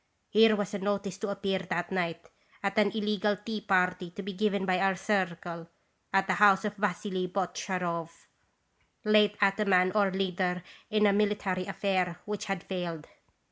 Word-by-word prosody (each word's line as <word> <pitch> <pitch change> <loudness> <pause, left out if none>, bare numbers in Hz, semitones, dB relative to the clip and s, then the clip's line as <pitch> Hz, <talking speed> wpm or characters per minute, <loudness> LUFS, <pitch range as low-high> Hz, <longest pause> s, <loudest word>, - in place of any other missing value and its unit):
Here 220 +1 +6
was 205 0 -3
a 205 - -2
notice 200 0 -2
to 210 - -3
appear 195 -1 -1
that 180 -1 -3
night 170 -3 -2 0.4
at 200 +1 +1
an 205 -1 +4
' - - -11
illegal 210 -1 0
' - - -29
tea 220 -2 -3
party 180 -2 +1
to 200 +4 -8
be 200 +1 -5
given 200 0 0
by 185 -1 +2
our 195 0 +2
'Circle' 170 -4 -2 0.4
at 195 0 +3
the 190 - +1
house 205 0 +6
of 205 0 -2
Vassily 185 -1 -1
Botcharov, 180 -2 -2 1.0
late 210 -1 +4
ataman 195 -2 +3
or 205 -2 +3
leader 185 -1 -1 0.3
in 210 0 +3
a 200 - +5
military 200 -3 0
affair 185 -3 -1
which 210 -1 -4
had 195 -2 -3
failed. 175 -4 -4
195 Hz, 170 wpm, -29 LUFS, 180-205 Hz, 1.0 s, Here